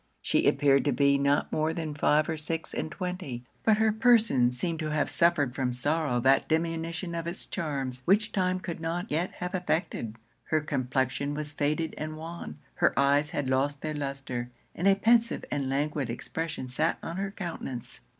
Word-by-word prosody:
She - - +2
appeared 140 -1 +4
to 145 - +3
be 140 +2 +3
not 140 +1 +2
more 155 +1 +1
than 160 -3 -3
five 150 +1 +3
or 160 - -1
six 160 +1 -4
and - - -2
twenty: 180 -9 -4 0.2
but 220 -1 +4
her 220 0 +4
person 220 - +4
seemed 160 +6 -3
to 155 -1 -2
have 150 -1 0
suffered 170 -7 +3
from 130 -2 -1
sorrow 145 +1 0
that 135 +2 +4
diminution 165 +1 -1
of 165 0 -3
its 170 - -4
charms, 135 -7 -3
which 205 +4 +3
time 185 -1 +1
could 175 -2 -5
not 165 +2 -3
yet 165 +5 0
have 180 +1 -5
effected. 165 - -1 0.3
Her 155 - +2
complexion 135 0 -1
was 150 0 -4
faded 150 +2 0
and 155 0 -4
wan; 165 0 -7 0.2
her - - +3
eyes 140 +2 +3
had 145 -2 -2
lost 135 +2 +1
their 155 0 -2
lustre; 135 -4 -4 0.2
and 185 - 0
a 195 - +6
pensive 230 +3 +3
and 140 -2 -1
languid 145 -1 -1
expression 155 +4 -4
sat 155 +6 0
on 165 +2 -4
her 195 0 -1
countenance. 170 - -6
155 Hz, 180 wpm, -28 LUFS, 140-170 Hz, 0.3 s, a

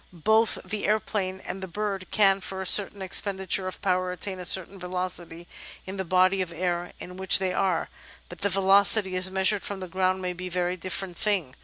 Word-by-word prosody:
Both 220 +1 +3
the 205 +2 -4
aeroplane 195 -3 -1
and 190 - -6
the 190 - -5
bird 195 0 -4
can, 195 -2 +3
for 190 0 -6
a 190 - -4
certain 200 +1 +4
expenditure 190 0 +1
of 185 - -8
power, 185 -1 0
attain 185 +1 -6
a 180 - -7
certain 190 +2 +3
velocity 180 -2 -4 0.4
in 190 +1 -7
the 190 - -2
body 185 +2 +2
of 180 -2 -4
air 175 +1 -3
in 180 +1 -10
which 190 0 +5
they 190 -2 -1
are, 185 -4 0 0.4
but 175 - -11
the 200 - +2
velocity 195 0 +4
as 185 +1 +3
measured 190 +2 0
from 200 -1 -6
the 185 - -6
ground 185 +1 0
may 180 -1 -3
be 180 +1 -7
a - - -6
very 180 0 -1
different 185 0 -5
thing. 190 -11 +1
185 Hz, 205 wpm, -26 LUFS, 180-195 Hz, 0.4 s, which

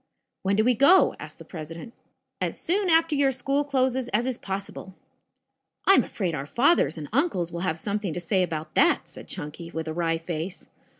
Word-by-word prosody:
"When 195 +1 +1
do 215 - +3
we 250 +2 +4
go?" 280 - +5
asked - - -9
the - - -12
president. 165 +6 -8 0.5
"As - - -2
soon 380 +2 0
after 325 -1 +4
your 280 -1 +3
school 275 +3 0
closes 260 -3 0
as 235 +2 0
is 255 -2 -2
possible." 195 -1 -6 0.9
"I 390 - +7
am - - +5
afraid 185 -6 -3
our 140 -1 -4
fathers 240 - +3
and 150 -2 -6
uncles 230 - +1
will 170 - -5
have 170 -2 -1
something 200 +1 -2
to 175 - -4
say 185 +2 +1
about 160 -3 -3
that," - - +3
said - - -12
Chunky 150 +3 -7
with 160 -1 -5
a 160 - -3
wry 165 -1 0
face. 165 +3 -5
195 Hz, 195 wpm, -26 LUFS, 165-265 Hz, 0.9 s, I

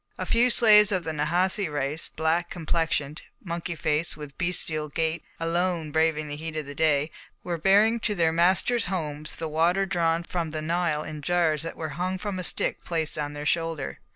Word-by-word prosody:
A - - -3
few 240 +2 +3
slaves 210 -3 +6
of 185 -3 0
the 160 - -3
Nahasi 175 +4 0
race, 145 +2 -1
black 165 +2 0
complexioned, 160 -3 -1 0.2
monkey 170 -1 -4
faced, 155 +1 0
with 145 -2 -9
bestial 160 -4 -1
gait, 160 +3 -1 0.2
alone 165 -1 -1
braving 160 -1 +1
the 145 - -5
heat 160 +1 -6
of 155 - -3
the 140 - -8
day, 150 0 +2 0.3
were 170 -2 -3
bearing 205 +6 +4
to 215 -2 -1
their 165 -3 +2
masters' 185 +8 +2
homes 155 -5 -2
the 165 - -4
water 170 +5 +2
drawn 170 -3 0
from 170 -2 -3
the 155 0 -4
Nile 165 -2 0
in 155 -1 -7
jars 165 -1 +1
that 165 - -6
were 160 -1 -4
hung 180 +6 -2
from 190 0 -4
a - - -4
stick - - -2
placed 160 -3 -2
on 145 0 -3
their 145 0 -6
shoulder. 165 - -1
165 Hz, 190 wpm, -26 LUFS, 155-180 Hz, 0.3 s, slaves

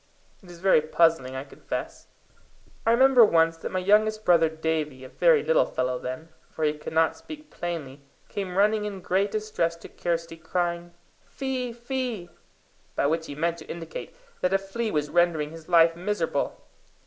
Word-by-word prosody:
It 185 - -16
is 175 - -11
very 185 -3 +4
puzzling, 155 -4 +2
I 130 - -4
confess. 140 - -6 0.8
I - - +6
remember 255 0 +7
once 165 -5 +4
that - - -6
my 185 - -1
youngest 215 +3 +2
brother 165 -2 +5
Davie, 155 -4 -2
a 130 - -9
very 485 -3 +4
little - - +3
fellow 125 0 -1
then, 130 +6 -6 0.2
for 160 - -5
he 150 -1 +3
could 150 +1 -8
not 160 0 +3
speak 305 -1 -11
plainly, 150 -6 -5 0.3
came 190 -2 -4
running 210 +1 +3
in 200 -2 -5
great 190 +3 +1
distress 210 -6 -1
to 170 - -12
Kirsty, 165 -1 -3
crying, 170 +1 -3 0.3
"Fee, 260 -2 -3
fee!" 240 -6 -4 0.6
by - - +1
which 160 +2 0
he 145 - -7
meant 170 +2 -1
to 155 - -11
indicate 165 -1 -7 0.2
that 180 +1 +1
a - - +6
flea 195 +4 -4
was 150 -5 -1
rendering 170 -4 +2
his 165 0 -12
life 165 -1 +5
miserable. 175 -5 -2
170 Hz, 170 wpm, -26 LUFS, 160-210 Hz, 0.8 s, remember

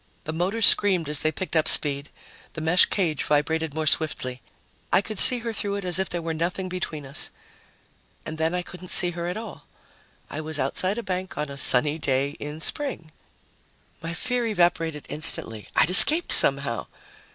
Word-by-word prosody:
The 155 - -6
motors 195 +7 0
screamed 185 -6 +4
as 150 -1 +5
they 155 - +4
picked 180 +3 -7
up 155 -1 +1
speed; 140 -1 +5 0.4
the - - -8
mesh 165 +3 +4
cage 165 -7 -2
vibrated 155 +1 -2
more 160 0 -3
swiftly; 130 -5 -2 0.5
I - - +4
could 210 +1 -6
see 250 - +5
her 230 - -4
through 200 -1 -3
it 200 -2 -6
as 180 0 +3
if 190 - -2
there 175 -1 -5
were 165 0 -4
nothing 175 +4 -4
between 165 -5 -6
us. 135 - -2 1.0
And 155 0 -8
then 160 +2 -1
I 180 - -3
couldn't 180 0 -11
see 175 0 +4
her 170 0 -6
at 180 - -5
all. 220 -3 -10 0.6
I 155 - -7
was 155 0 -7
outside 185 - -2
a 235 - -5
bank 185 -2 -6
on 150 -1 -4
a - - -8
sunny 145 +4 +1
day 135 -1 -2
in 150 +2 -8
spring. 170 - -6 0.9
My 165 0 -6
fear 245 +7 -3
evaporated 170 -6 -1
instantly 115 -8 -1
I'd 170 - +2
escaped 310 - +7
somehow! - - +3
165 Hz, 185 wpm, -23 LUFS, 150-185 Hz, 1.0 s, escaped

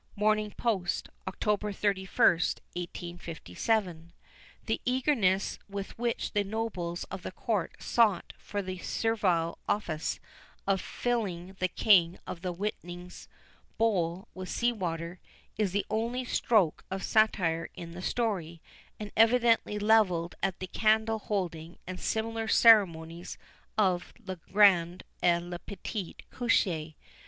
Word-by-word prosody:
Morning 215 0 +2
Post, 195 -7 -1 0.2
October 210 +2 -1
31st, 190 -4 +2 0.2
1857. 175 - -3 0.5
The - - -1
eagerness 245 -7 +1
with 200 0 -5
which 240 -1 -1
the 205 - +1
nobles 195 -5 -3
of 190 0 -5
the - - -6
Court 200 -2 -2
sought 215 -7 +2
for 205 -1 -4
the 185 -1 -5
servile 180 -7 0
office 165 -7 -1 0.5
of 195 -1 +1
filling 195 -7 -2
the 185 - +2
King 180 -2 +4
of 170 - -6
the 180 -1 -2
Whiting's 180 -1 -6 0.5
bowl 190 -3 +1
with 185 0 -7
sea 240 0 +1
water, 170 -4 -4 0.4
is 210 -4 0
the 205 +2 0
only 235 +4 -1
stroke 210 -9 +2
of 190 0 -4
satire 175 -7 +2
in 170 -1 -8
the 175 +2 -8
story, 185 -7 -1 0.4
and 210 -1 -6
evidently 230 -2 +4
levelled 205 -6 +3
at 190 -1 0
the 185 - -5
candle 220 +3 +2
holding 175 -6 -3
and 185 0 -6
similar 225 0 -2
ceremonies 175 -8 +4 0.4
of 185 -4 +1
"le 190 -2 -5
grand 180 -1 +4 0.2
et 170 0 +3
le 175 0 -6
petit 200 -1 -6 0.2
coucher." 165 -10 +1
190 Hz, 125 wpm, -30 LUFS, 175-220 Hz, 0.5 s, King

